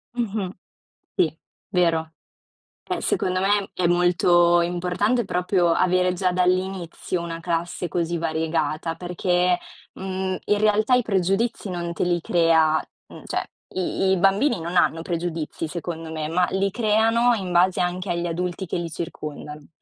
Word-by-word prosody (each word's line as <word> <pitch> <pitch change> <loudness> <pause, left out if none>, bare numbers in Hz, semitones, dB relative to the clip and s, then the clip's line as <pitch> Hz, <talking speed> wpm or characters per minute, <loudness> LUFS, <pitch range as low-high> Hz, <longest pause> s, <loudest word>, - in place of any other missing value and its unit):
Mh-mh. 210 -5 -2 0.6
Sì, - - +1 0.3
vero. 165 -4 +1 0.8
Eh, - - -1
secondo 185 0 0
me 200 +1 +1
è 180 - -1
molto 175 0 +4
importante, 180 +7 0
proprio 180 -1 +1
avere 180 0 +2
già 180 0 0
dall'inizio 180 -1 -1
una 165 -1 -5
classe 170 +1 -2
così 170 +1 -1
variegata, 160 0 -1
perché, 180 +1 +1 0.4
mhmm, 190 0 -3
in 210 - +2
realtà 215 +3 +3
i 250 - +3
pregiudizi 195 +2 0
non 170 -1 -3
te - - -1
li 175 -1 +1
crea, 160 -2 +3 0.3
mhmm, - - -12
cioè, - - -2 0.3
i 190 +1 0
i 190 - +3
bambini 195 +6 +3
non 170 +2 -5
hanno 165 -2 +2
pregiudizi 165 -2 -3
secondo 165 -1 -5
me, 155 -1 -3
ma 180 +2 +2
li 195 +1 0
creano 225 +2 +3
in 185 -4 -4
base 180 +1 +3
anche 180 +1 -1
agli 170 0 -1
adulti 180 +2 -3
che 180 - -3
li 170 -1 -3
circondano. 150 -2 -7
180 Hz, 145 wpm, -23 LUFS, 170-190 Hz, 0.8 s, molto